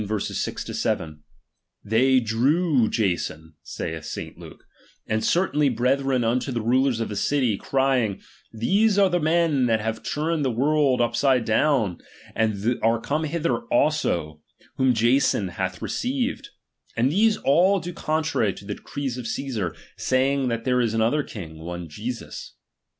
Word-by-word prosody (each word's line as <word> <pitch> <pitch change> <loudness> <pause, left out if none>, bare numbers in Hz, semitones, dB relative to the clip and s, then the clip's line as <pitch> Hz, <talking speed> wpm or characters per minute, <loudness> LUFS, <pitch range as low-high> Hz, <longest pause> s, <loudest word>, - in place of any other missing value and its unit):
6 105 -2 -3
7): 75 -2 -2 0.6
They 130 +5 +4
drew 125 +3 +2
Jason, 85 -6 -2
saith 80 -1 -5
St. - - -6
Luke, - - -13 0.4
and 110 0 -1
certain 150 -7 +2
brethren 130 +1 +1
unto 125 +4 0
the 120 - -1
rulers 125 +2 +2
of 115 - -1
the 105 - -5
city, 125 0 +1
crying, 130 -4 0 0.3
these 195 - +2
are 195 -2 +4
the 175 - +2
men 160 -4 +2
that 110 -1 +2
have 110 +1 -3
turned 155 +1 -1
the 135 - +1
world 135 +1 +2
upside 120 +1 +2
down, 110 - +1 0.3
and 110 +2 0
are 115 +1 +2
come 150 +6 -1
hither 155 -6 -1
also, 85 - 0 0.4
whom 130 -2 +3
Jason 115 -4 +2
hath 95 0 -4
received; 260 +1 -2 0.5
and 125 +4 +2
these 215 +5 +3
all 185 +8 +3
do 175 +1 -6
contrary 155 - 0
to 100 - -12
the 105 - -3
decrees 135 +2 -5
of 120 - -7
C<ssar, 115 - -3 0.2
saying 135 +1 +1
that 115 -1 -2
there 125 -1 +2
is 115 -2 0
another 115 +7 +2
Icing, 80 - -9
one 85 +1 -6
t/esus. 115 +10 -7
125 Hz, 145 wpm, -24 LUFS, 110-150 Hz, 0.6 s, They